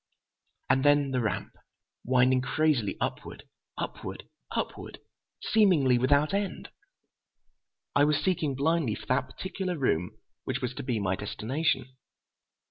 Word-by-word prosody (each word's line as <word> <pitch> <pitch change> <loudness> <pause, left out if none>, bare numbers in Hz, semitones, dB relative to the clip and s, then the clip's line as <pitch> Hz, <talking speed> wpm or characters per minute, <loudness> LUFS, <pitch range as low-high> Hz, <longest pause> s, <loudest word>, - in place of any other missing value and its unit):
And 135 - +3
then 145 -1 +4
the 130 -1 +1
ramp, 105 -5 -2 0.5
winding 130 +1 +3
crazily 140 -5 +1
upward—upward—upward, - - -6 0.4
seemingly 160 - +4
without 145 +6 +3
end. 200 -1 -2 1.3
I 145 - +5
was 150 -1 +3
seeking 155 -5 0
blindly 145 -4 +1
for - - -10
that 130 0 +1
particular 185 +5 -4
room 90 - 0 0.3
which - - -2
was - - -3
to - - -6
be 125 -3 -1
my 95 -1 0
destination. 130 +6 -2
135 Hz, 115 wpm, -28 LUFS, 125-155 Hz, 1.3 s, I